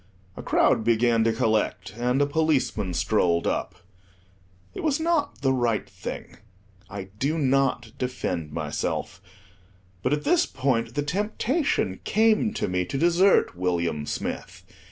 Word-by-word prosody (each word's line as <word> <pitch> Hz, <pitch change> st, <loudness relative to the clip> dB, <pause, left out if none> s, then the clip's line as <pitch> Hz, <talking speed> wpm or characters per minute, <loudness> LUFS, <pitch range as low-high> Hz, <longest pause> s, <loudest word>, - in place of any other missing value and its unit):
A -, -, -7 dB
crowd -, -, +2 dB
began 115 Hz, 0 st, +3 dB
to 115 Hz, -, +3 dB
collect; 110 Hz, -3 st, 0 dB
and 125 Hz, +3 st, 0 dB
a 145 Hz, -, +4 dB
policeman 140 Hz, -, 0 dB
strolled 85 Hz, 0 st, +1 dB
up. -, -, -2 dB, 1.0 s
It -, -, -6 dB
was 305 Hz, -1 st, +1 dB
not 320 Hz, -, 0 dB
the 135 Hz, -1 st, +3 dB
right 120 Hz, -4 st, 0 dB
thing: -, -, -8 dB, 0.5 s
I 95 Hz, -1 st, -7 dB
do 150 Hz, +4 st, 0 dB
not 135 Hz, -5 st, +1 dB
defend 90 Hz, -, -3 dB
myself; 75 Hz, -1 st, -3 dB, 0.8 s
but, 125 Hz, -, 0 dB
at 150 Hz, 0 st, 0 dB
this 355 Hz, +1 st, +3 dB
point, 130 Hz, -3 st, -1 dB
the 145 Hz, -, 0 dB
temptation 210 Hz, -, -1 dB
came 220 Hz, +1 st, +3 dB
to -, -, -1 dB
me 90 Hz, -1 st, 0 dB
to 115 Hz, -, -4 dB
desert 175 Hz, -, +3 dB
William 85 Hz, -4 st, -1 dB
Smith. -, -, -5 dB
125 Hz, 135 wpm, -25 LUFS, 100-165 Hz, 1.0 s, a